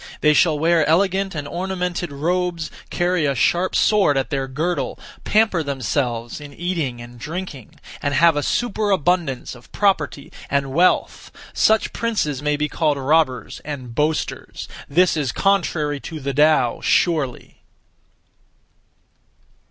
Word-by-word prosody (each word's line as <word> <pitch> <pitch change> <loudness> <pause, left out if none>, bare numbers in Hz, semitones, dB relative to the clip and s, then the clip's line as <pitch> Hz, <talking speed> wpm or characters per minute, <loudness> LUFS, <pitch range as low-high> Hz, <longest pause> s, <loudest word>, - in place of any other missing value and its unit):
They 150 0 +5
shall 155 0 +3
wear 165 +1 +3
elegant 195 +3 +1
and 145 -1 -4
ornamented 180 -1 -3
robes, 170 +2 -1 0.2
carry 175 -3 +1
a 140 - 0
sharp 175 +9 +1
sword 195 -10 +3
at 135 - -1
their 135 -2 -1
girdle, 160 +7 -2 0.3
pamper 215 -5 +3
themselves 125 -3 -2
in 145 -1 -11
eating 165 -8 -2
and 120 0 -11
drinking, 150 - -7 0.3
and 145 0 -1
have 165 +2 +5
a 145 - 0
superabundance 185 - 0
of 120 -1 -16
property 150 - 0 0.2
and 135 -1 -1
wealth; 175 +5 +1 0.2
such 220 0 +2
(princes) 180 - -1
may 150 0 0
be 150 +1 0
called 150 -1 0
robbers 135 -4 0
and 130 -5 -7
boasters. 150 +4 -2 0.2
This 180 +5 +3
is 145 -6 -1
contrary 165 -7 0
to 160 +3 -7
the 140 0 -3
Tao 150 -4 +3
surely! 150 -8 0
155 Hz, 130 wpm, -21 LUFS, 140-180 Hz, 0.3 s, They